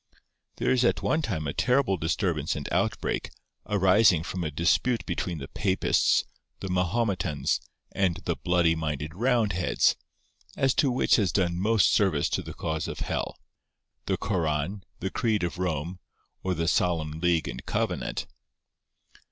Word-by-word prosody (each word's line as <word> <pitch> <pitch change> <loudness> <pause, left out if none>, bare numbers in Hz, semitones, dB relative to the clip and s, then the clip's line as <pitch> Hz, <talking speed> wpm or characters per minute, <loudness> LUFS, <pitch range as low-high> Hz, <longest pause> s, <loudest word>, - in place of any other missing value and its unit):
There - - 0
is 130 -1 +3
at - - +1
one 155 - +1
time 90 - -3
a 70 - -2
terrible 125 -4 +2
disturbance 85 -1 -1
and 75 - -5
outbreak, - - -1 0.4
arising 95 -3 +4
from 90 +1 -4
a 80 - -1
dispute 90 - +1
between 85 -1 -3
the 70 -2 -7
Papists, 95 -2 +2 0.3
the 95 - -5
Mahometans, 90 -4 0 0.3
and 95 -4 +1
the - - 0
bloody 90 -2 +2
minded 75 -1 -3
Roundheads, 105 -4 +2 0.6
as 135 -2 +3
to 140 - +2
which 125 - +3
has 100 -6 +1
done 85 -3 +1
most 110 0 +4
service 90 -8 +2
to - - -1
the - - -9
cause 80 -1 -3
of - - -6
hell,—the - - -6
Koran, 85 0 -1 0.2
the 95 - -2
Creed 110 -5 0
of 85 +1 -3
Rome, 90 0 -2 0.4
or 95 -1 -1
the 80 0 -1
Solemn 80 -2 0
League 85 -1 +1
and - - -6
Covenant. - - -2
90 Hz, 145 wpm, -27 LUFS, 80-105 Hz, 0.6 s, arising